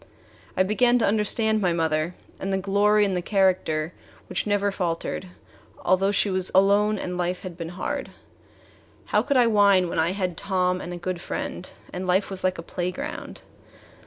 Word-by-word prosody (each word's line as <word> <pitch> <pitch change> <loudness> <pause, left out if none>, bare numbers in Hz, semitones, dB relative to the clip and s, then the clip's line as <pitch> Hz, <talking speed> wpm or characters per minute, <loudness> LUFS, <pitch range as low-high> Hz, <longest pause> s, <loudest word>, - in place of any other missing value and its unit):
I 185 - +5
began 240 +5 +3
to 235 - +2
understand 220 +1 +1
my 180 -3 +2
mother 160 +1 0 0.2
and 195 - -3
the 190 - +1
glory 205 +2 +3
in 195 - -1
the 180 - -1
character 180 -5 +1 0.4
which - - -1
never 205 -1 +1
faltered, 180 0 -3 0.6
although 190 +2 +3
she 205 0 +2
was 185 0 0
alone 205 +2 +4
and 180 -2 -4
life 180 +1 -1
had 185 -3 -7
been 165 -1 -6
hard. 180 +2 -4 1.0
How - - +2
could 280 - +1
I 245 - +6
whine 200 -5 +4
when - - -2
I 165 +3 +2
had 185 -4 -2
Tom 185 -2 0
and 175 - -6
a 175 - -5
good 175 0 -4
friend 180 - -5 0.2
and 185 +1 -4
life 190 +2 +1
was 190 - -5
like 185 0 +1
a 165 - -6
playground? 180 +2 -5
185 Hz, 180 wpm, -25 LUFS, 180-205 Hz, 1.0 s, I